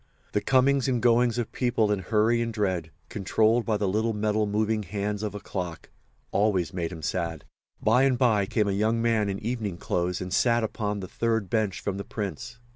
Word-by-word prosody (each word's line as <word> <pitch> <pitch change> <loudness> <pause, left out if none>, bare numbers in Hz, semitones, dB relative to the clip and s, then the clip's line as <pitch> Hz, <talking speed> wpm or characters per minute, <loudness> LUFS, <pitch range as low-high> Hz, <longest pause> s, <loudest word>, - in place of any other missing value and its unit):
The 105 - 0
comings 135 +2 +3
and 125 -2 +1
goings 120 0 +3
of 120 -2 -2
people 120 -4 +1
in 105 - +1
hurry 110 +4 +2
and 115 0 -1
dread, 95 -7 -1 0.2
controlled 110 +4 +1
by 110 -2 +2
the 105 - 0
little 110 +4 0
metal 105 0 0
moving 105 +1 0
hands 105 +2 -3
of 105 -1 -3
a - - -4
clock, 90 -4 -6 0.4
always 100 -3 +1
made 85 -2 -2
him 80 -3 -8
sad. 85 -4 -2 0.3
By 115 +4 +3
and 130 -2 +2
by 110 -6 +3
came 105 0 +1
a - - +1
young 110 +4 +1
man 115 -3 +1
in 100 - -2
evening 110 -4 -3
clothes 90 +1 -1
and 90 0 -5
sat 120 +1 +3
upon 105 -2 -2
the 95 - -6
third 115 -4 -1
bench 105 -3 0
from 100 -1 -3
the 100 - -4
Prince. 105 +3 -5
105 Hz, 200 wpm, -26 LUFS, 100-115 Hz, 0.4 s, comings